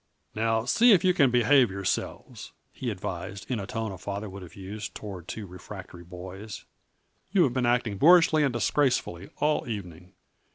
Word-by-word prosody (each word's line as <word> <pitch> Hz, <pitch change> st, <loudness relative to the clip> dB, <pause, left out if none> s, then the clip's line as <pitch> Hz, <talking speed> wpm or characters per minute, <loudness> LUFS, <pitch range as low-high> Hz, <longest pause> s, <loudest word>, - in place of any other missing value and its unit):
"Now, 115 Hz, +1 st, 0 dB
see 230 Hz, -, +5 dB
if 185 Hz, -, +4 dB
you 185 Hz, -1 st, +4 dB
can 140 Hz, -7 st, +4 dB
behave 125 Hz, +1 st, +4 dB
yourselves," 95 Hz, -1 st, -4 dB, 0.2 s
he 125 Hz, -, -4 dB
advised, 95 Hz, -1 st, -5 dB
in 120 Hz, -, 0 dB
the 100 Hz, -, -6 dB
tone 115 Hz, -3 st, -3 dB
a 95 Hz, -, -9 dB
father 100 Hz, +1 st, -5 dB
would 100 Hz, +1 st, -9 dB
have 90 Hz, -, -12 dB
used 100 Hz, +2 st, -7 dB
toward 95 Hz, -5 st, -8 dB
two 110 Hz, -, -6 dB
refractory 90 Hz, -1 st, -10 dB
boys. 95 Hz, +4 st, -9 dB, 0.7 s
"You 190 Hz, -2 st, +4 dB
have 130 Hz, -, +1 dB
been 125 Hz, -2 st, 0 dB
acting 120 Hz, -5 st, 0 dB
boorishly 165 Hz, -1 st, +6 dB
and 140 Hz, -, +2 dB
disgracefully 120 Hz, -5 st, 0 dB
all 150 Hz, -4 st, 0 dB
evening. 90 Hz, -4 st, -7 dB
110 Hz, 170 wpm, -27 LUFS, 95-125 Hz, 0.7 s, boorishly